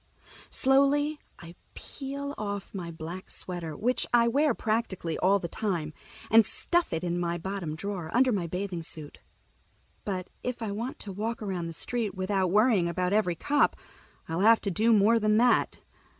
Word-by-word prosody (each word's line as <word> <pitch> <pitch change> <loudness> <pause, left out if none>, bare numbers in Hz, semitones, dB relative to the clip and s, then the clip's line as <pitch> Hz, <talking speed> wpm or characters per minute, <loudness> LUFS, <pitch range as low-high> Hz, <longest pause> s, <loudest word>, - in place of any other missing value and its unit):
Slowly 285 +3 +3 0.2
I 170 0 -11 0.2
peel 280 0 -6
off 205 -2 -5
my 180 -4 -5
black 170 +3 -7
sweater, 170 -4 -5
which 250 +3 0
I 235 -1 +5
wear 280 +2 +2
practically 215 -7 -1
all 195 +2 +4
the 180 - -4
time, 170 -5 -2 0.4
and 225 0 +8
stuff 345 - -1
it 165 +1 -2
in 175 0 -1
my 170 0 -1
bottom 175 -3 -4
drawer, 180 -1 -4
under 255 +4 +4
my 190 -6 -1
bathing 180 0 -3
suit. 155 -2 -7 0.8
But 185 -3 -3
if 250 -1 -4
I 215 - -2
want 230 +6 -4
to 200 - -3
walk 220 +4 -3
around 185 -4 -3
the 165 - -6
street 220 +2 -3
without 190 0 0
worrying 210 -2 +4
about 180 +2 -1
every 205 -5 +2
cop, 290 - +2 0.5
I'll 165 +1 -2
have 225 +3 +6
to 200 - -1
do 220 +6 +3
more 220 +2 +5
than 215 0 +3
that. 245 +2 +3
200 Hz, 170 wpm, -28 LUFS, 175-230 Hz, 0.8 s, and